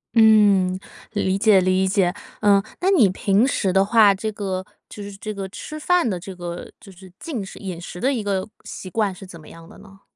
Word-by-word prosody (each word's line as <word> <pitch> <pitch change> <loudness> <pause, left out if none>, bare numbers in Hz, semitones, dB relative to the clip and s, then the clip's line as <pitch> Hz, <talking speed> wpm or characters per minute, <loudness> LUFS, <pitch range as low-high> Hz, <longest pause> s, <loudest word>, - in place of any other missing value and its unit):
嗯， 205 -4 +5 0.4
理 195 -2 0
解 200 -2 +5
理 185 +1 +2
解。 185 -2 +1 0.3
呃， 200 -2 +5 0.2
那 375 - +2
你 270 - +5
平 200 +4 +2
时 195 -8 0
的 195 +1 +3
话， 215 -1 +5
这 210 +3 -4
个 190 -2 -4 0.2
就 210 - -9
是 200 0 -8
这 210 +2 -6
个 195 -1 -5
吃 305 +10 -8
饭 355 -5 +2
的 185 - -3
这 190 +2 -9
个 175 -1 -7
就 200 - -13
是 185 0 -15
进 250 -12 -5
食 195 - -11
饮 185 -4 -6
食 175 +1 -9
的 270 +3 +2
一 235 - -2
个 195 -1 -2 0.2
习 185 - -8
惯， 200 -1 -1
是 195 - -11
怎 180 -3 -12
么 155 - -15
样 165 0 -14
的 - - -15
呢？ 195 -1 -17
195 Hz, 235 characters per minute, -22 LUFS, 185-215 Hz, 0.4 s, 嗯